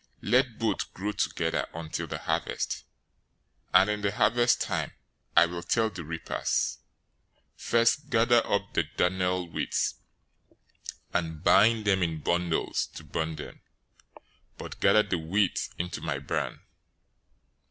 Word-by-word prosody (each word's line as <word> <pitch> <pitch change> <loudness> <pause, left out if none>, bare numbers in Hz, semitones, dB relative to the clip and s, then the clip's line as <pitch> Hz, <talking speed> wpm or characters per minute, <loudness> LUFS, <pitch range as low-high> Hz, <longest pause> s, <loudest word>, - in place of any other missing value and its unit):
013:030 - - -4
Let 125 -2 +3
both 110 -4 -1
grow 100 +3 -2
together 85 -5 -1
until 80 -1 -4
the - - -4
harvest, - - -2 0.9
and 95 - +6
in 105 0 -1
the 100 -1 +1
harvest 120 +4 +3
time - - -2 0.4
I - - +9
will 85 0 -5
tell 110 +4 +1
the 90 -3 -7
reapers, 80 +1 -2 0.8
"First, 115 +5 +2
gather 120 0 +4
up 100 0 0
the - - +1
darnel 90 0 +1
weeds, - - -1 1.1
and 80 -3 -2
bind 110 +2 +5
them 95 -2 +3
in 80 -2 -1
bundles 85 +1 0
to - - -8
burn 80 0 -3
them; 75 - -9 1.0
but - - -8
gather 105 - +5
the 90 - -2
wheat 95 +5 0
into 85 -3 -4
my 75 -3 -2
barn."'" 70 - -3
95 Hz, 130 wpm, -28 LUFS, 85-110 Hz, 1.1 s, I